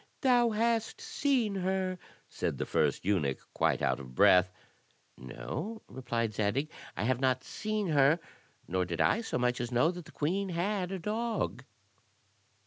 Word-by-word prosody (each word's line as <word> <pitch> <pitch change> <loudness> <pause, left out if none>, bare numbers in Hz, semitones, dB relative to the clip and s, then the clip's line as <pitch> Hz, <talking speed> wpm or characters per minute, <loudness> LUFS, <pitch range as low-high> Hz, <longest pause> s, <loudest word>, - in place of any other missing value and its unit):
"Thou 245 -3 +4
hast 225 +1 0
seen 280 - 0
her," 185 -1 -1 0.3
said - - -3
the - - -2
first - - 0
eunuch, 80 -10 +1 0.2
quite - - +1
out - - +1
of 65 -2 -10
breath. 90 +4 +6 0.6
"No," 185 - -6
replied 115 -4 -2
Zadig, 110 +9 0 0.3
"I - - -1
have 125 +2 +1
not 130 -1 +1
seen 215 -3 -2
her, 145 +2 +4 0.5
nor 95 +1 0
did 85 -2 -4
I 225 - +3
so 225 - -2
much 125 0 +1
as 120 0 -4
know 125 +8 +3
that 175 -2 -8
the - - -13
queen 190 +6 -1
had 185 +2 -1
a 190 - -2
dog." 220 +5 -2
170 Hz, 155 wpm, -31 LUFS, -, 0.6 s, breath